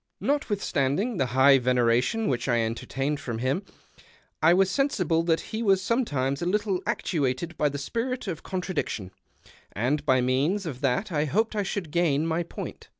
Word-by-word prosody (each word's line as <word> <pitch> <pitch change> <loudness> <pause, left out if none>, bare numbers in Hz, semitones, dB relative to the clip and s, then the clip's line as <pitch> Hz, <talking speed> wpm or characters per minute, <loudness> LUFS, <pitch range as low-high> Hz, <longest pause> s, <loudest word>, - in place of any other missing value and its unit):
Notwithstanding 205 - 0
the 135 -4 +1
high 135 +2 +5
veneration 125 - +2
which 125 -1 -1
I 120 -2 +2
entertained 135 +6 -2
for 115 -5 -4
him, 130 - 0 0.8
I 160 +2 +6
was 190 +1 +4
sensible 185 - +1
that 165 -1 +1
he 220 - -1
was 195 -4 +3
sometimes 145 - 0
a 175 - -1
little 200 -1 0
actuated 155 +2 -1
by 150 - +1
the 145 - -5
spirit 235 - -3
of 175 -6 -4
contra 185 0 -4
diction, 100 - -3 0.6
and 135 +8 0
by 130 -3 +3
means 140 +11 +1
of 140 -5 -6
that 140 +9 0
I 150 -2 +1
hoped 215 +9 0
I 210 - +1
should 190 -5 -4
gain 160 -3 +2
my 165 +1 0
i)oint. 170 - -8
155 Hz, 170 wpm, -26 LUFS, 130-195 Hz, 0.8 s, I